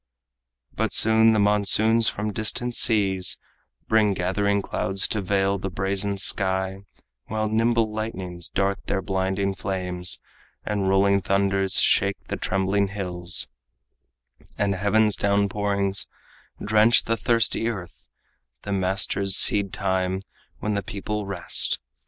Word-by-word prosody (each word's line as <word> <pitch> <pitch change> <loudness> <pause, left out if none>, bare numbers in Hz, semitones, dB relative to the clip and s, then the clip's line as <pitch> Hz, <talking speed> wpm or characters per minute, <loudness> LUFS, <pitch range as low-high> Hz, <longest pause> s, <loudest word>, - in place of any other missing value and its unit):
But - - -2
soon 110 0 +6
the 110 - +1
monsoons 105 +2 +3
from 105 +1 -4
the - - -6
distant 120 +3 0
seas 100 -6 +2 0.5
Bring 110 -3 +2
gathering 100 +3 -1
clouds 95 0 -2
to 105 - -2
veil 95 +1 0
the 95 - -4
brazen 95 +2 -2
sky, 95 -1 +2 0.5
While 110 0 -2
nimble 115 0 +1
lightnings 95 -6 -5
dart 100 0 -2
their 95 -1 -2
blinding 95 0 -2
flames, 90 -2 -2 0.5
And 100 -2 -1
rolling 100 +1 +2
thunders 95 0 +1
shake - - +2
the - - -2
trembling 95 +1 -1
hills, 90 -3 -2 1.1
And 100 -1 0
heaven's 105 +2 +1
downpourings 100 -1 0 0.5
drench 110 +2 +3
the 115 - -1
thirsty 115 0 0
earth 95 -7 -7 0.6
The 100 - -6
master's 95 0 +1
seed 100 -2 +5
time 95 -1 -2 0.4
when 105 - -3
the 100 - -1
people 105 +1 -5
rest. 100 - -1
100 Hz, 120 wpm, -23 LUFS, 95-105 Hz, 1.1 s, soon